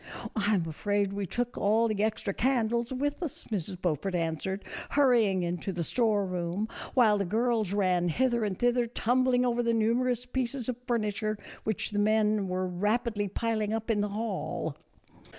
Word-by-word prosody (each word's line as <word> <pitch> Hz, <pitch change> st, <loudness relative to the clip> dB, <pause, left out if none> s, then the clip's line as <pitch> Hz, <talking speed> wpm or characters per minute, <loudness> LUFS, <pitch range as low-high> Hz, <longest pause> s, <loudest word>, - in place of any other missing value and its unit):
" -, -, -9 dB
I 215 Hz, -1 st, +2 dB
'm 170 Hz, -4 st, 0 dB
afraid 200 Hz, +5 st, 0 dB
we 200 Hz, -1 st, -3 dB
took 245 Hz, +6 st, -2 dB
all 220 Hz, +3 st, +3 dB
the 215 Hz, -2 st, -1 dB
extra 215 Hz, -2 st, -1 dB
candles 235 Hz, -1 st, +1 dB
with 290 Hz, +5 st, -2 dB
us," 325 Hz, -6 st, -3 dB
Mrs. 185 Hz, -2 st, -2 dB
Beaufort 180 Hz, +2 st, -1 dB
answered, 170 Hz, +4 st, -2 dB, 0.2 s
hurrying 230 Hz, -10 st, +3 dB
into 175 Hz, +2 st, -2 dB
the 170 Hz, -2 st, -2 dB
store 215 Hz, +1 st, +1 dB
room, 180 Hz, +3 st, -2 dB, 0.3 s
while 220 Hz, -5 st, +5 dB
the -, -, +1 dB
girls 220 Hz, +1 st, +1 dB
ran 185 Hz, -3 st, +2 dB
hither 240 Hz, +5 st, +1 dB
and 200 Hz, -3 st, -2 dB
thither 245 Hz, +1 st, +2 dB
tumbling 250 Hz, +2 st, +2 dB
over 240 Hz, -1 st, +1 dB
the 235 Hz, -1 st, +1 dB
numerous 240 Hz, +2 st, +1 dB
pieces 250 Hz, -1 st, -2 dB
of 250 Hz, -2 st, -2 dB
furniture 215 Hz, -2 st, -1 dB, 0.3 s
which 215 Hz, -1 st, -1 dB
the 205 Hz, -, 0 dB
men 215 Hz, -1 st, +2 dB
were 185 Hz, 0 st, -1 dB
rapidly 210 Hz, +4 st, 0 dB
piling 215 Hz, +1 st, -1 dB
up 225 Hz, +1 st, -1 dB
in 210 Hz, -2 st, +1 dB
the 205 Hz, -, -1 dB
hall. 210 Hz, -1 st, -3 dB
215 Hz, 170 wpm, -29 LUFS, 195-240 Hz, 0.3 s, while